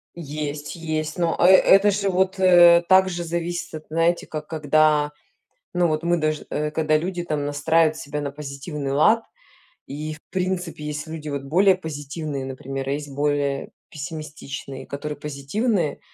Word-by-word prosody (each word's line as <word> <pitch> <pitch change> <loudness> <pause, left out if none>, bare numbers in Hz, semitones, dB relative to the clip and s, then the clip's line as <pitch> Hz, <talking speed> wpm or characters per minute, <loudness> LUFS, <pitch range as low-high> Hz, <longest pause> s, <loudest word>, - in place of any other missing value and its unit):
Есть 150 -2 -5
есть, 155 -2 -3
но, 170 -2 +1
э, - - +4
э - - +8 0.3
это 200 +1 +4
же 200 0 0
вот, 190 +1 +1
э, 175 -2 +7
так 190 0 +6
же 175 -1 -4
зависит, 170 0 -3
от 155 - -8
знаете, 165 +2 +1
как 155 -1 -6
когда, 150 -1 +2 0.6
ну, 175 -1 +3
вот 155 0 -1
мы 175 0 +2
даж 155 -1 -1
э, 150 0 -1
когда 155 0 +2
люди 175 +2 -3
там 150 -3 -2
настраивают 155 +2 +2
себя 150 0 -5
на 140 -1 -3
позитивный 140 0 -5
лад. 215 +11 +4 0.6
И 155 +2 -5
в 155 - -14
принципе 180 -3 -2
есть 150 0 -4
люди 155 -1 -7
вот 140 -1 -3
более 185 +7 +4
позитивные, 145 -3 -5
например, 135 0 -5
а 135 - 0
есть 145 0 -4
более 145 -1 -1 0.2
пессимистичные, 145 -2 -7
которые 145 +1 -5
позитивные, 150 - -1
155 Hz, 165 wpm, -23 LUFS, 145-175 Hz, 0.6 s, э